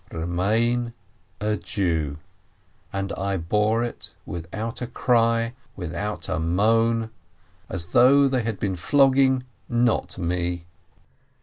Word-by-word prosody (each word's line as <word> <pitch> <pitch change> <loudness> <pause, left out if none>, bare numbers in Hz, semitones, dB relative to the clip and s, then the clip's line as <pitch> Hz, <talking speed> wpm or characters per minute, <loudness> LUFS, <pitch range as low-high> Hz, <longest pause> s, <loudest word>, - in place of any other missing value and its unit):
Remain 110 +8 0 0.5
a 105 0 0
Jew," 85 -5 -1 0.7
and 95 0 -3
I 100 0 -1
bore 105 +7 +1
it 120 - -6
without 100 +9 -5
a 125 - -2
cry, 115 -1 +2 0.2
without 95 +4 -4
a 90 -3 -1
moan, 110 +6 +2 0.6
as 85 -2 -2
though 140 +3 +6
they 130 -2 +1
had 110 -3 -3
been 95 -2 -1
flogging 130 - +4 0.3
not 120 -1 +1
me. 85 -1 -2
105 Hz, 110 wpm, -24 LUFS, 90-120 Hz, 0.7 s, though